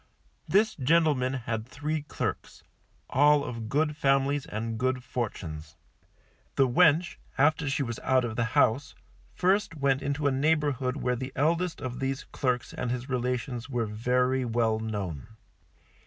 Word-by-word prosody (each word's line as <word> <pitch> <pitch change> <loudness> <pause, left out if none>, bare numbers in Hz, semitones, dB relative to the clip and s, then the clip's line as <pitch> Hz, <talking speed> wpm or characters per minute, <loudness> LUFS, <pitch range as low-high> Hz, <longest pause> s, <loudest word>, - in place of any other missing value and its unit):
This 215 +2 +3
gentleman 145 -3 +2
had 115 -2 -3
three 150 +4 -3
clerks, 145 - -5 0.4
all 145 +1 +4
of 115 -5 -5
good 150 +3 +1
families 140 0 +1
and 110 +1 -4
good 130 0 0
fortunes. 85 -11 -5 0.8
The 135 - +4
wench, 160 +5 +3 0.2
after 145 +1 +3
she 140 +1 0
was 115 -3 -4
out 130 -1 +2
of 110 -2 -4
the 120 - +1
house, 135 +6 +2 0.4
first 190 -1 +1
went 140 -2 +1
into 140 +1 -2
a 140 - +4
neighbourhood 140 -2 +1
where 125 -3 0
the 130 +2 -5
eldest 165 +3 0
of 130 -2 -5
these 135 0 -2
clerks 125 -3 -2
and 125 - -3
his 125 +2 -3
relations 125 0 -2
were 120 -3 -1
very 125 +4 +1
well 115 -2 +1
known. 100 -8 -4
130 Hz, 145 wpm, -28 LUFS, 120-145 Hz, 0.8 s, all